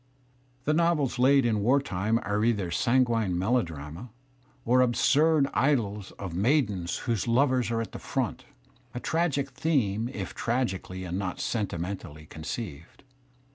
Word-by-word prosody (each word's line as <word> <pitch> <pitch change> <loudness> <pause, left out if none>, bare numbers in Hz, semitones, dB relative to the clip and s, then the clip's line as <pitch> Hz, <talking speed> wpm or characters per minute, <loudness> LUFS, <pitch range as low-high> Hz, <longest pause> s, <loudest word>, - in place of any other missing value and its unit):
The 150 - +1
novels 155 -6 +1
laid 135 +1 +5
in 110 -3 +1
war 130 +7 +4
time 110 -4 0
are 105 +1 0
either 105 -7 +1
sanguine 115 -5 +2
melodrama 85 - -2 0.6
or 125 +2 +4
absurd 145 +5 +3
idyls 105 -5 0
of 95 -4 -7
maidens9\ 100 - +1
whose 115 -4 -1
lovers 125 -1 +2
are 115 -1 0
at 115 - -6
the - - -7
front 130 -4 -3 0.2
— 130 -1 -30
a - - -2
tragic 145 -3 0
theme 120 -7 0
if 100 -7 -5
tragically 95 -6 -2
• 95 - -5
and 90 +2 -3
not 95 -2 -4
sentimentally 90 -7 -4
conceived. 80 +1 -7
115 Hz, 140 wpm, -28 LUFS, 95-130 Hz, 0.6 s, laid